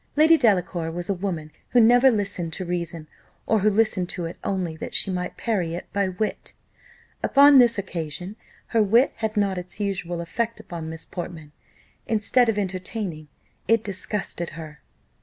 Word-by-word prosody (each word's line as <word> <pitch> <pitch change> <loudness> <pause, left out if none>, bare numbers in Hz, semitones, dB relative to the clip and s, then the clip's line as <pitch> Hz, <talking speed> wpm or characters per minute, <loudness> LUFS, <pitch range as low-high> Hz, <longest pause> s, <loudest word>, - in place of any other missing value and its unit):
Lady 315 +2 +6
Delacour 180 - +1
was 175 +3 -5
a - - +3
woman 175 -5 -4 0.2
who 245 - +4
never 245 +3 +6
listened 200 -7 -1
to 185 - -4
reason, 170 -2 -4 0.4
or 220 - +2
who 210 +2 +3
listened 205 -4 +1
to 175 - -4
it 165 - -6
only 185 -5 -2
that - - -6
she 195 - +2
might 180 -1 -4
parry 185 -8 -1
it 175 - -6
by 200 -1 +1
wit. 185 +4 -4 0.7
Upon 280 0 +7
this 235 -3 +5
occasion, 180 0 -5 0.3
her 230 - +3
wit 230 +6 +4
had 220 -1 -3
not 195 -3 +1
its 180 +3 -7
usual 180 -4 -2
effect 225 +7 -3
upon 170 -6 -7
Miss 160 0 -6
Portman; 165 -4 -7 0.6
instead 225 +2 +3
of 215 - 0
entertaining, 185 -4 -4 0.4
it 225 -1 +3
disgusted 195 -3 -3
her. 155 -3 -9
190 Hz, 165 wpm, -24 LUFS, 170-220 Hz, 0.7 s, Upon